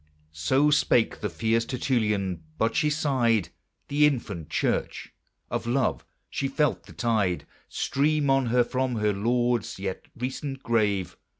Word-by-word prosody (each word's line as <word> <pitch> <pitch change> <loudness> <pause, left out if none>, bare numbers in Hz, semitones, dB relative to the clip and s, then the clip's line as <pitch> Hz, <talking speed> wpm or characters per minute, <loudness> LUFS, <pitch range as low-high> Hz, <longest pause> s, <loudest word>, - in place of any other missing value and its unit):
So 130 - +2
spake 125 -5 +3
the 105 - -1
fierce 110 +7 +1
Tertullian. 105 - -1 0.2
But 115 +1 +1
she 150 - +3
sighed, 125 - +1 0.4
The 150 +1 +4
infant 105 - -3
Church! - - -1 0.4
of - - -2
love 125 +2 0 0.2
she 135 - -2
felt 145 0 0
the - - -12
tide 105 -7 0 0.2
Stream 150 +1 +1
on 135 -2 +3
her 120 +1 +4
from 130 +1 -1
her 105 -1 +1
Lord's 120 +2 0
yet 95 -1 -4
recent 135 +2 -4
grave. 105 -5 0
120 Hz, 135 wpm, -26 LUFS, 105-135 Hz, 0.4 s, The